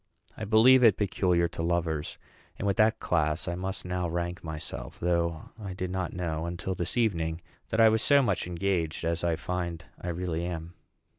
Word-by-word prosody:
I 110 - -5
believe 120 +5 +6
it 110 -5 +6
peculiar 90 -4 +2
to - - -6
lovers; 80 -3 -1 0.4
and - - -4
with 100 -1 +1
that 110 +1 +4
class 80 -1 0
I 85 - -1
must 95 +2 -4
now 90 -1 -2
rank 85 +1 -3
myself, 75 -6 -6
though 85 -2 -1
I 100 -3 -5
did 90 -1 -3
not 95 -2 -2
know, 85 -3 -3
until 85 +2 -3
this 90 +5 -3
evening, 80 -8 +1 0.3
that 110 - -1
I 115 - +8
was 110 0 +3
so 140 +2 +5
much 100 -7 0
engaged 85 -3 -1
as 85 +1 -1
I 85 -1 +2
find 85 -1 -4 0.2
I - - -6
really 85 -1 -2
am. 85 -1 -5
90 Hz, 190 wpm, -28 LUFS, 85-95 Hz, 0.4 s, I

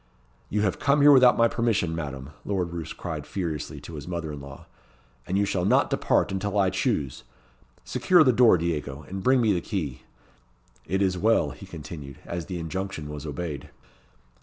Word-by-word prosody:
"You 105 - 0
have 100 -3 0
come 140 +1 +3
here 145 +1 +8
without 130 -3 +7
my 115 - +5
permission, 115 -8 0
Madam," 70 -3 -5
Lord 90 -4 -2
Roos 85 -3 -5
cried - - -6
furiously 85 -7 -4
to 85 - -10
his 75 -1 -7
mother 85 -3 -4
in 70 - -7
law, 70 0 -11 0.6
"and 95 - 0
you 100 - +3
shall 95 -3 -1
not 95 - +3
depart - - +2
until 100 +1 -2
I 95 -2 +3
choose. 70 -3 -1 0.6
Secure 175 -3 +4
the 130 -4 +4
door, 115 -5 +6
Diego, 75 -4 -3
and 95 +1 -5
bring 130 +6 +4
me 110 -3 +3
the 90 - -1
key. 75 - -4 0.9
It 95 +4 +1
is 90 -2 0
well," 115 +4 +3
he 95 - -11
continued, 75 -5 -8
as 85 -1 -5
the 90 -3 -4
injunction 85 -2 -4
was 75 +1 -6
obeyed. 75 -1 -5
90 Hz, 185 wpm, -26 LUFS, 75-100 Hz, 0.9 s, here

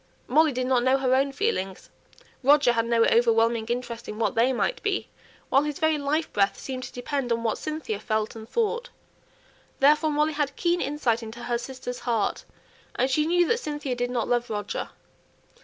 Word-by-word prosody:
Molly 310 +4 +4
did 255 -1 -2
not 255 -1 +2
know 260 +2 +3
her 260 -1 +1
own 275 +1 +2
feelings; 275 - -2 0.5
Roger 285 -1 +5
had 230 -1 0
no 230 -1 +3
overwhelming 230 -1 +3
interest 235 -1 -4
in 210 - -6
what 225 - 0
they 235 +3 +3
might 260 - -1
be; 405 -1 -1 0.4
while 270 - +4
his 295 -1 -3
very 315 -1 +2
life 300 +3 -1
breath 200 -1 +2
seemed 260 -1 -5
to - - -9
depend 250 0 -3
on 230 0 0
what 225 - -1
Cynthia 305 -9 -4
felt 215 0 -2
and 220 0 -10
thought. 470 +2 -1 0.9
Therefore 300 +3 +4
Molly 300 +1 +1
had 290 -2 -1
keen 345 0 +1
insight 265 -5 0
into 225 +1 -8
her 240 0 -1
"sister's" 250 0 -6
heart; 230 -4 -1 0.5
and 260 +2 +1
she 300 +3 +2
knew 350 0 +3
that 465 - +1
Cynthia 295 - -3
did 245 0 -2
not 245 -2 -1
love 240 0 0
Roger. 205 -2 -3
255 Hz, 190 wpm, -26 LUFS, 235-295 Hz, 0.9 s, Roger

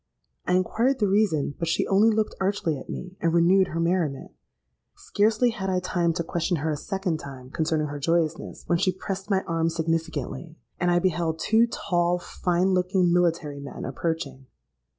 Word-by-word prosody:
I - - +2
inquired 230 +8 +1
the 210 -5 +1
reason; 190 -8 +1
but 165 - -2
she 165 - +1
only 205 +3 +4
looked 220 -1 0
archly 195 -4 0
at 130 - -9
me, 185 0 -6
and 165 - +2
renewed 185 +3 +5
her 165 - -4
merriment. 170 -5 -1 0.6
Scarcely 220 +4 +1
had 190 -3 -4
I 185 -1 +1
time 175 -2 0
to 170 - -2
question 170 +2 -1
her 155 +2 -1
a - - -1
second 185 +1 -2
time 130 -3 -10
concerning 155 0 0
her 145 -1 -5
joyousness, 165 +2 -1
when 170 - +1
she 185 - +2
pressed 195 +1 -5
my 195 -2 +2
arm 165 0 0
significantly; 165 -2 -3 0.2
and 175 - +1
I 175 - +3
beheld 170 -3 0
two 225 +7 +3
tall, 175 -5 0
fine 180 +1 0
looking 180 -1 +2
military 165 -5 +1
men 140 0 -7
approaching. 135 -2 -4
175 Hz, 175 wpm, -25 LUFS, 160-190 Hz, 0.6 s, renewed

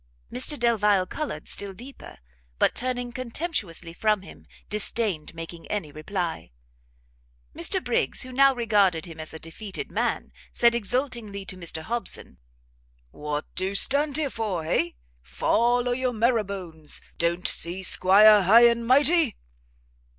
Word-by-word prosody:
Mr 260 +4 -1
Delvile 210 -5 +2
coloured 185 - -5
still 200 -1 -3
deeper, 250 +8 -10 0.4
but - - +3
turning 245 -1 -2
contemptuously 235 - -4
from 210 +1 +1
him, - - -14 0.2
disdained 210 -6 0
making 165 0 -9
any 185 -8 -3
reply. 165 - -4 1.1
Mr - - +1
Briggs, - - 0
who 255 - -9
now 275 +2 +5
regarded 205 -8 +2
him 165 -2 -10
as 155 - -5
a 160 - -7
defeated 190 +5 -7
man, - - -2 0.2
said 235 0 +4
exultingly 235 -3 -2
to 185 - -5
Mr 170 -3 -5
Hobson, 230 - -4 0.7
"what 150 - -4
do 190 +1 -2
stand 285 +6 +3
here 295 -4 -1
for? 205 -7 -3
hay? 170 +1 0 0.3
fall 235 - +1
o' - - +1
your 250 0 -1
marrowbones; 200 -9 -1 0.2
don't 170 +1 0
see 180 +3 -1
'Squire 205 +3 +6
High 225 +6 +7
and 235 0 0
Mighty?" 290 +1 +3
210 Hz, 135 wpm, -25 LUFS, 170-245 Hz, 1.1 s, High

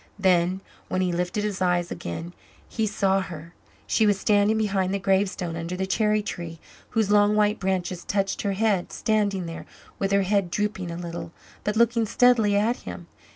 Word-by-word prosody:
Then, 185 -1 +2 0.3
when 185 - -1
he 180 -1 +1
lifted 180 +4 -1
his 205 -3 -3
eyes 175 -1 +1
again, 165 - -5 0.3
he 220 -1 -1
saw 195 -1 +1
her! 170 -2 -8 0.3
She 220 - +2
was 205 -2 +2
standing 210 +1 +3
behind 195 -3 0
the 200 - 0
gravestone, 190 -3 0
under 170 +2 -4
the 190 - -1
cherry 210 +2 +1
tree, 170 -5 -6 0.3
whose 220 -3 +1
long 205 0 +5
white 210 0 +2
branches 185 -2 -2
touched 195 -1 -1
her 200 -1 -1
head; 200 -3 +1
standing 205 -4 0
there, 165 0 -7 0.3
with 195 0 0
her 200 0 +3
head 195 -1 +1
drooping 205 -1 -2
a 170 - -5
little, 170 -1 -6 0.3
but 210 - -1
looking 230 0 +3
steadily 225 -3 +4
at 220 +4 +2
him. - - -8
195 Hz, 180 wpm, -25 LUFS, 180-210 Hz, 0.3 s, long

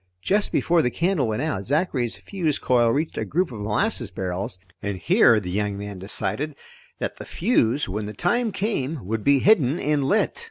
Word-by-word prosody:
Just 205 +1 +1
before 170 0 +2
the 125 - +1
candle 170 0 0
went 110 +5 -1
out, 155 -11 -2
Zachary's 135 - 0
fuse 170 -7 -2
coil 120 -2 +2
reached 150 +7 -1
a - - -1
group 175 -2 -1
of 110 - -7
molasses 110 - 0
barrels, 90 0 -3 0.2
and 100 -1 -3
here 160 - +4
the 90 -3 -6
young 100 +1 -1
man 100 -1 -7
decided 140 +9 -1 0.4
that - - -4
the - - -7
fuse, 150 - +1
when 105 +2 -4
the 105 - -6
time 225 - 0
came, 160 - -2
would 110 +2 -3
be 140 0 +5
hidden 155 - +4
and 150 -4 0
lit. 205 - +1
135 Hz, 190 wpm, -24 LUFS, 105-175 Hz, 0.4 s, be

